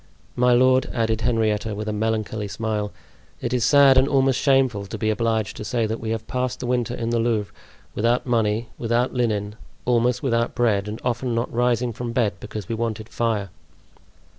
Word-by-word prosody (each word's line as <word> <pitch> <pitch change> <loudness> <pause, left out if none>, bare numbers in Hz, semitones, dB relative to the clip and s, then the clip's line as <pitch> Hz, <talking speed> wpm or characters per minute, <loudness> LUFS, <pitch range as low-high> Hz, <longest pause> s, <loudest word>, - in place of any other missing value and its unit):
My 125 0 +3
lord," 130 +1 +4
added 115 -2 0
Henrietta, 110 -2 0
with 105 +1 -5
a 105 - -1
melancholy 110 -1 -2
smile, 105 0 -3 0.5
"it 120 - -3
is 125 -2 +1
sad 135 0 +6
and 130 - +3
almost 135 -2 +2
shameful 130 -7 +2
to - - -6
be 110 -1 0
obliged 110 -1 -1
to - - -5
say 115 +1 0
that 110 +1 -3
we 110 - -5
have 110 0 -3
passed 125 0 -2
the - - -4
winter 125 -1 0
in 115 -1 -3
the 120 - +1
Louvre 115 -3 0 0.4
without 120 +3 +1
money, 115 -2 0
without 120 +2 0
linen, 105 -4 -1 0.3
almost 125 0 +2
without 115 -3 0
bread, 105 -5 +1
and 105 +2 -5
often 120 0 -1
not 115 +2 -2
rising 120 0 +1
from 120 0 -5
bed 115 -5 +1
because 105 -5 -7
we - - -3
wanted 110 -1 -3
fire." 110 -5 -1
115 Hz, 190 wpm, -23 LUFS, 110-125 Hz, 0.5 s, sad